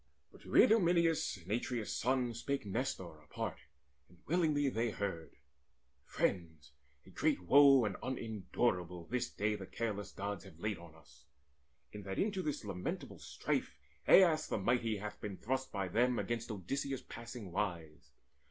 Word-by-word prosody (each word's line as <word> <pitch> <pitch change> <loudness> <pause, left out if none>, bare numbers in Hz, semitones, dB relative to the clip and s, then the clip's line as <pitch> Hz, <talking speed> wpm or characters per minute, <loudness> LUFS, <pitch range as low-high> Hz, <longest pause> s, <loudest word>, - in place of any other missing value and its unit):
But - - -17
to - - -7
Idomeneus 170 - +4
and 90 +1 -10
Atreus' 120 0 -1
son 125 -1 +1
Spake 140 +2 -3
Nestor 95 - -3
apart, 75 - -5 0.5
and 90 - -20
willingly 155 -4 +2
they 115 -2 0
heard: 100 -6 -4 0.7
"Friends, 80 -5 -2 0.3
a - - -15
great - - +1
woe 135 +3 +7
and 100 -2 -2
unendurable 100 -7 -2
This 125 +5 -2
day 105 +1 0
the 100 -3 -6
careless 105 -3 -3
Gods 100 0 -4
have 80 - -14
laid 105 +2 -2
on 85 -2 -13
us, 80 -2 -20 0.7
In 105 - -7
that 95 -1 -5
into 200 -2 0
this 150 -9 -3
lamentable 105 - -4
strife - - -2 0.3
Aias 165 -5 +6
the - - -1
mighty 115 +1 +1
hath 105 +1 -7
been 100 -3 -5
thrust 130 +3 -2
by 100 -2 -2
them 120 +6 +2
Against 115 0 -2
Odysseus 135 +7 -3
passing 115 -4 -8
wise. 85 -5 -3
110 Hz, 150 wpm, -35 LUFS, 95-130 Hz, 0.7 s, woe